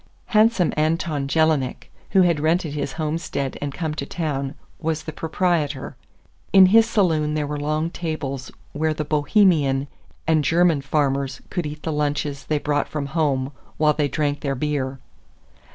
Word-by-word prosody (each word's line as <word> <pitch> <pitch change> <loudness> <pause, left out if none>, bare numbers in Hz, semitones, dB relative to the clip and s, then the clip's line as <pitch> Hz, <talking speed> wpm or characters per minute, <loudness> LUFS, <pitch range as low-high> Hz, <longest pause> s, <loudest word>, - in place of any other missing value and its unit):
Handsome 215 -4 +4
Anton 155 -2 0
Jelinek, 155 -3 +1 0.2
who 190 -2 +5
had 170 -4 +2
rented 160 0 +1
his 145 -2 -3
homestead 155 -4 -3
and 145 -1 -2
come 160 +1 -3
to 145 -2 -4
town, 140 -4 -3 0.2
was 160 -1 -2
the 155 - -6
proprietor. 155 -5 -1 0.6
In 190 -1 +8
his 225 0 +6
saloon 160 -8 +2
there 150 -1 0
were 145 0 -4
long 155 +3 -1
tables 145 -7 -4 0.2
where 155 +1 0
the 150 - -3
Bohemian 150 -3 +3 0.4
and 155 -1 +3
German 165 +1 +3
farmers 140 -2 0
could 175 -5 -2
eat 150 0 -8
the 160 - -2
lunches 145 -1 -1
they 155 - 0
brought 145 0 0
from 150 -2 -3
home 140 -4 +1 0.3
while 150 0 +4
they 150 -1 +1
drank 145 +1 -1
their 140 -2 -2
beer. 135 -1 -2
150 Hz, 155 wpm, -23 LUFS, 140-160 Hz, 0.6 s, In